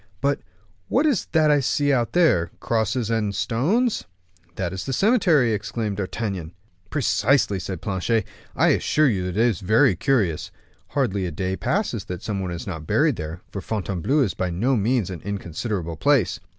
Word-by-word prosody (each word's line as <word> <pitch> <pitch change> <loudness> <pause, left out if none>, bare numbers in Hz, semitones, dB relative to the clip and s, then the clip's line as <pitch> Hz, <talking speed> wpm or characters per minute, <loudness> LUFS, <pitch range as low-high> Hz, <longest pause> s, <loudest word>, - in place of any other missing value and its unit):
"But 140 0 +1 0.5
what 275 +5 +2
is 280 - +1
that 155 -2 +4
I 145 - +4
see 145 +2 +1
out 120 -3 0
there, 155 - +3
crosses 115 0 0
and 105 -3 0
stones?" 195 - +1
"Ah, 90 -1 -36
that 95 -1 -3
is 95 - -4
the 135 - -3
cemetery," 170 - +3
exclaimed 105 0 -3
D'Artagnan. 95 -4 -4 0.4
"Precisely," 130 -6 +2
said 90 -1 -6
Planchet; 100 +2 0 0.3
"I - - +4
assure 155 -1 +3
you 95 -7 0
it 90 +2 -4
is 115 -4 +2
very 100 -1 +4
curious. 100 - 0 0.5
Hardly 95 -1 +1
a - - -4
day 95 +4 -2
passes 125 - -1
that 90 -1 -6
some 105 -3 -2
one 95 -1 -3
is 85 -1 -5
not 80 -5 -6
buried 150 -6 +2
there; 80 +2 -6
for 100 - -5
Fontainebleau 100 - -1
is 115 -8 +1
by 95 - -2
no 115 +11 +1
means 110 -2 +1
an 90 - -7
inconsiderable 90 -2 -4
place. 140 -9 +2
105 Hz, 175 wpm, -23 LUFS, 90-135 Hz, 0.5 s, that